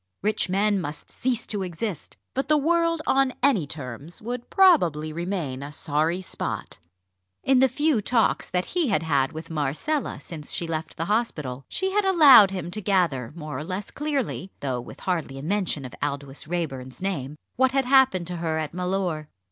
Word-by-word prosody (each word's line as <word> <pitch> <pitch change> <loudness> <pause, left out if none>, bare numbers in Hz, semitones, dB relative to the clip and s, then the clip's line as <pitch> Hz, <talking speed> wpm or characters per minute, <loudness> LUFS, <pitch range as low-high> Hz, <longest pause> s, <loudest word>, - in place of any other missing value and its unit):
Rich 210 -2 +1
men 200 +1 +2
must 150 -2 -6
cease 245 -2 -1
to 205 -2 -3
exist; 185 +1 -5 0.2
but 270 - -1
the 305 - +5
world 335 +1 +2
on 270 -1 +3
any 215 - +3
terms 140 +2 -7
would 240 +2 -5
probably 170 - +4
remain 170 -6 -3
a 140 +1 -6
sorry 155 +4 0
spot. - - -5 0.6
In 265 -1 +4
the 265 - +6
few 290 -2 +1
talks 230 +2 +1
that 180 0 0
he 345 -4 +2
had 200 -6 +1
had 140 -4 +1
with 165 +1 -8
Marcella 155 - -1
since 155 -4 -7
she 170 - 0
left 160 -1 -4
the 165 - -1
hospital, 150 - -2
she 380 +1 -1
had 415 +1 +2
allowed 290 - +8
him 180 -3 -5
to 215 - -4
gather 170 - +1
more 155 -3 -5
or - - -4
less 185 +4 -5
clearly 280 - -2
though 130 -3 -2
with - - -12
hardly 165 -7 -2
a 135 - -7
mention 180 -5 -1
of 125 - -8
Aldous 140 -1 -4
Raeburn's 135 -7 -4
name 150 -8 -3 0.2
what 260 +1 +3
had 270 -1 +2
happened 260 -9 +4
to 175 0 -5
her 165 -1 -1
at 155 -1 -3
Mellor. 180 -4 -2
180 Hz, 180 wpm, -25 LUFS, 150-245 Hz, 0.6 s, allowed